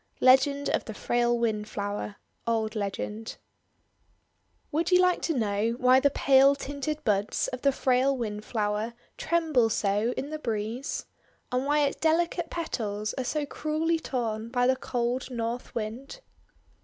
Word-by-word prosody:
LEGEND 280 +2 +4
OF - - 0
THE 220 - -7
FRAIL 240 +1 +1
WINDFLOWER 210 -2 -2 0.3
Old 220 -1 0
Legend 210 +2 -4 1.3
WOULD 325 +3 0
you 360 -1 +5
like 365 -1 +3
to 325 -5 -1
know 215 0 0
why 255 +1 +5
the 285 +1 +4
pale 275 0 +5
tinted 285 +2 -4
buds 205 -2 +1
of 255 - -6
the 280 - +4
frail 260 +1 +2
Windflower 215 0 -2 0.2
tremble 315 -9 +2
so 210 +2 +1
in 285 +3 -4
the 310 - -4
breeze? 230 +1 -3 0.5
And 255 +2 0
why 295 +1 +3
its 280 -1 +1
delicate 335 +1 +1
petals 215 -11 -3
are 260 - -3
so 295 +4 -1
cruelly 310 +3 -1
torn 230 -6 -3
by 245 0 +1
the 260 +1 +4
cold 245 0 -2
North 235 0 -4
Wind? 240 - -5
250 Hz, 145 wpm, -28 LUFS, 220-285 Hz, 1.3 s, you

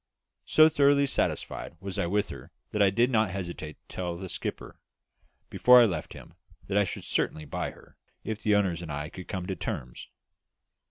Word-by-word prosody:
So 155 0 +7
thoroughly 140 -2 +4
satisfied 105 -9 -2
was 95 0 -5
I 85 - +1
with 100 +3 0
her - - -9 0.2
that 105 - 0
I 100 - +6
did 120 +6 +2
not 110 -4 +3
hesitate 85 -5 -5
to - - -12
tell 90 -2 -3
the 95 +1 -7
skipper, - - -6 0.7
before 125 0 +7
I 120 - +7
left 85 -8 -3
him, - - -12 0.3
that 95 - -3
I 100 - +3
should 90 - -5
certainly 75 - -1
buy - - -3
her, - - -17 0.3
if 110 0 -4
the 105 -1 +3
owners 95 -4 +1
and 80 -3 -6
I 75 +1 -4
could 90 +1 -10
come 95 -3 -4
to 95 - -3
terms. - - -5
95 Hz, 195 wpm, -28 LUFS, 85-110 Hz, 0.7 s, So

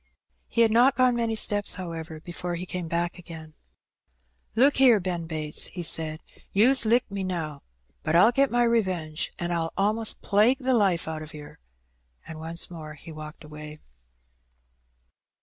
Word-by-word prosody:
He 235 - 0
had 225 -1 +4
not 250 +4 +4
gone 255 -1 +3
many 230 -1 -1
steps, 205 -1 +3
however, 165 -3 -7
before 175 +1 -6
he 175 +2 -6
came 180 -2 -5
back 170 +2 -2
again. 160 -3 -11 1.0
"Look 270 +5 +4
here, 250 -5 +5
Ben 175 -3 -4
Bates,'' 155 -2 0
he 175 - -7
said, 155 -1 +2 0.3
"you's 235 +4 +4
licked 235 -1 +1
me 200 -1 -4
now, 160 -6 -4 0.4
but 155 - -1
I'll 185 +7 +6
get 275 +2 +2
my 240 0 +1
revenge, 185 -9 -1
an' 175 0 -4
I'll 165 -1 -2
a'most 215 +3 +1
plague 215 +6 +3
the 260 -1 -1
life 195 -9 +1
out 160 -1 -5
o' 155 0 -10
yer," 150 0 -13 0.7
and 160 - -9
once 165 +2 +1
more 155 -3 -9
he 160 - -12
walked 155 0 -10
away. 150 0 -10
175 Hz, 165 wpm, -25 LUFS, 160-225 Hz, 1.0 s, I'll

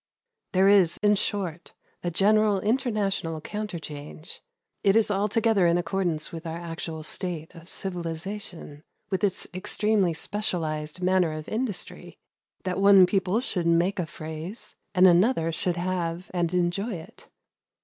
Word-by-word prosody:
There 190 +1 +5
is, 195 -5 +5
in 205 0 +5
short, 190 -4 -2 0.3
a 175 - 0
general 205 +3 +3
international 205 - 0
counterchange. 160 -6 -6 0.4
It 195 0 +4
is 225 -2 +4
altogether 205 -1 +2
in 170 +1 +3
accordance 175 -3 -1
with 165 0 -7
our 165 +1 -4
actual 165 -1 -6
state 165 0 -3
of 170 0 -12
civilization, 175 -3 -5 0.3
with 190 +2 -1
its 195 -2 0
extremely 195 -1 +1
"specialized" 160 -4 -2
manner 180 -3 +3
of 155 0 -6
industry, 220 -4 -4 0.5
that 185 +1 -2
one 200 -2 +8
people 190 +2 +1
should 180 -10 -1
make 175 +4 +2
a 170 - -1
phrase, 160 +7 -7 0.2
and 185 0 +6
another 180 -1 +4
should 175 +2 -1
have 175 0 -2
and 175 -2 0
enjoy 180 +5 0
it. 160 -1 -11
180 Hz, 135 wpm, -26 LUFS, 165-200 Hz, 0.5 s, one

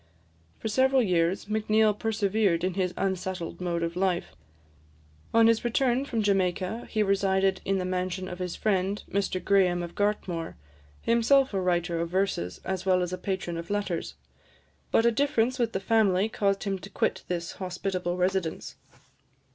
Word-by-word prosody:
For - - -5
several 260 +3 +3
years, 180 -2 +1
Macneill 215 0 +2
persevered 205 -4 0
in 185 0 0
his 185 -1 0
unsettled 185 -2 -3
mode 170 -1 -1
of 170 0 -2
life. 180 -1 0 1.0
On 230 0 +5
his 230 0 +3
return 250 +2 +1
from 230 -5 -1
Jamaica, 195 +2 0
he 215 -2 +1
resided 195 -1 +1
in 195 0 +1
the 185 - -2
mansion 185 0 -2
of 180 0 -7
his 180 -1 -3
friend, 200 -1 0
Mr 195 -2 0
Graham 185 -3 +3
of 170 - -7
Gartmore, 190 -5 -2 0.5
himself 250 +3 +3
a 195 - 0
writer 175 -1 0
of 170 0 -2
verses, 180 - -1
as 190 -1 -2
well 185 -1 +3
as 180 0 -4
a - - -2
patron 185 -3 -3
of 170 0 -7
letters; 205 -4 -2 0.7
but 225 - +3
a 235 - +5
difference 255 -1 +1
with 235 -2 +1
the 190 - -2
family 200 -2 +2
caused 200 -2 0
him 195 -2 -2
to 195 - -10
quit - - -1
this 170 -1 -3
hospitable 185 -1 -3
residence. 180 -2 -1
190 Hz, 165 wpm, -27 LUFS, 180-215 Hz, 1.0 s, On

